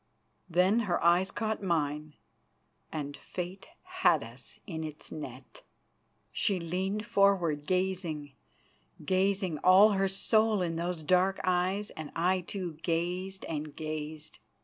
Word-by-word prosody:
Then 180 +6 +4
her 175 - +2
eyes 175 +3 +4
caught 220 -2 -2
mine, 150 -4 -1 0.8
and 145 -2 -4
Fate 180 +6 -6 0.2
had 370 - +2
us 120 +2 -12
in 160 -3 -5
its 155 -1 -8
net. 130 -4 -9 0.7
She 195 -3 +1
leaned 190 +5 -2
forward, 175 -8 +2
gazing, 180 -6 -1 0.7
gazing, 190 -3 +1
all 190 +5 +7
her 195 -1 +2
soul 215 +1 +2
in 165 -2 -2
those 170 -1 -3
dark 185 +4 +3
eyes, 185 +3 0
and 155 -2 -8
I, 180 +3 +2
too, 175 -3 -5
gazed 180 +3 -2
and 150 -2 -5
gazed. 155 0 -6
180 Hz, 125 wpm, -30 LUFS, 155-190 Hz, 0.8 s, all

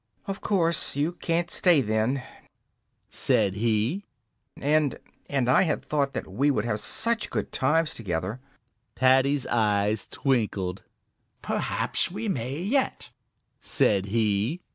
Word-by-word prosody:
"Of 195 0 -5
course 170 -8 +1
you 145 +4 0
can't 175 0 -2
stay 175 -5 +4
then," 110 +3 0 0.8
said 95 - +2
he, 115 - 0 0.5
"and 150 0 +1 0.3
and 135 -3 0
I 130 - +5
had 165 -5 0
thought 140 -2 0
that - - -4
we 125 +10 +1
would 115 -6 0
have 110 -2 -1
such 225 - +1
good - - -3
times 150 +4 +1
together." 95 +2 -3 0.6
Paddy's 130 +2 +3
eyes 105 -2 +1
twinkled. 105 -8 -1 0.6
"Perhaps - - -1
we 210 +5 -5
may 130 - -2
yet," 260 +7 -1 0.5
said 105 -9 +1
he. 110 - 0
130 Hz, 120 wpm, -26 LUFS, 110-165 Hz, 0.8 s, I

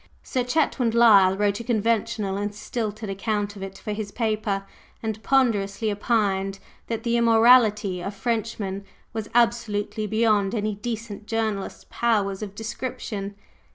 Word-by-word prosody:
Sir 255 - -1
Chetwynd 250 -3 +1
Lyle 200 -5 +6
wrote 205 0 +1
a - - -5
conventional 220 -3 0
and 205 +1 -3
stilted 215 0 -4
account 205 +1 -2
of 195 - -10
it 195 0 -7
for 210 - -4
his 210 -1 -5
paper, 215 -4 -1 0.4
and 220 -1 -3
ponderously 220 -5 +1
opined 200 -3 0 0.3
that 230 -1 -3
the 235 -1 +1
immorality 225 -5 +5
of 195 +3 -5
Frenchmen 215 -4 -2 0.3
was 220 -2 -4
absolutely 225 -3 +1
beyond 215 -1 +2
any 215 -1 -1
decent 215 0 -6
journalist's 220 -4 -2
powers 205 -4 +1
of 205 -2 -6
description. 225 -3 -5
215 Hz, 135 wpm, -24 LUFS, 200-230 Hz, 0.4 s, Lyle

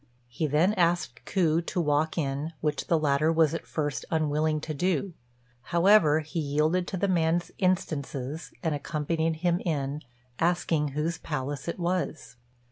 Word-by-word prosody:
He 155 +6 -2
then 160 +8 +3
asked 175 -2 0
Ku 170 -4 +2
to 175 - -3
walk 155 0 +1
in, 145 +1 -2
which 150 -1 -2
the 165 - +3
latter 150 +1 +2
was 160 -1 +3
at 165 - -5
first 145 -3 -2
unwilling 155 -1 +1
to 155 - -4
do; 180 +3 0 0.5
however, 170 -2 +5
he 155 +3 -5
yielded 155 +4 +1
to 190 - -3
the 200 - +1
man's 170 -1 +1
instances, 155 -5 -1
and 160 -2 +1
accompanied 160 +2 -1
him 175 0 +3
in, 145 -4 -2 0.4
asking 165 -4 +1
whose 165 +2 -1
palace 145 -2 -4
it 170 - -3
was. 175 -5 -2
160 Hz, 150 wpm, -28 LUFS, 150-170 Hz, 0.5 s, however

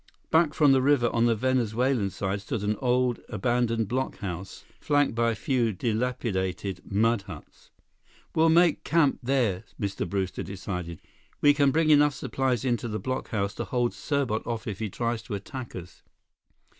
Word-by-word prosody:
Back 160 -2 +3
from 145 -3 +5
the 135 -1 +4
river 130 -3 +3
on 115 0 +3
the 115 - +3
Venezuelan 125 -1 +1
side 95 +1 -3
stood 105 +1 -4
an 105 +1 0
old, 125 0 +1
abandoned 120 -3 0
blockhouse 100 -7 -4 0.2
flanked 145 -2 +2
by 115 0 +2
a 115 - -1
few 120 -1 0
dilapidated 100 -4 -2
mud 110 +2 +2
huts. - - -12 0.6
"We'll 160 +1 +4
make 170 0 +4
camp 150 -2 +2
there," 120 -8 0 0.2
Mr. 100 -1 -3
Brewster 95 -2 -2
decided. 90 -4 -6 0.4
"We 145 0 +6
can 140 -1 +3
bring 155 +2 +3
enough 145 -1 +5
supplies 130 -1 -1
into 120 -1 0
the 110 -1 -3
blockhouse 110 -6 -2
to - - -3
hold 120 -1 0
Serbot 140 -7 -1
off 115 -2 -3
if 100 -4 -5
he 110 -2 -2
tries 115 +2 -2
to 110 -1 -5
attack 120 +5 -7
us." 90 -1 -10
120 Hz, 160 wpm, -27 LUFS, 100-135 Hz, 0.6 s, We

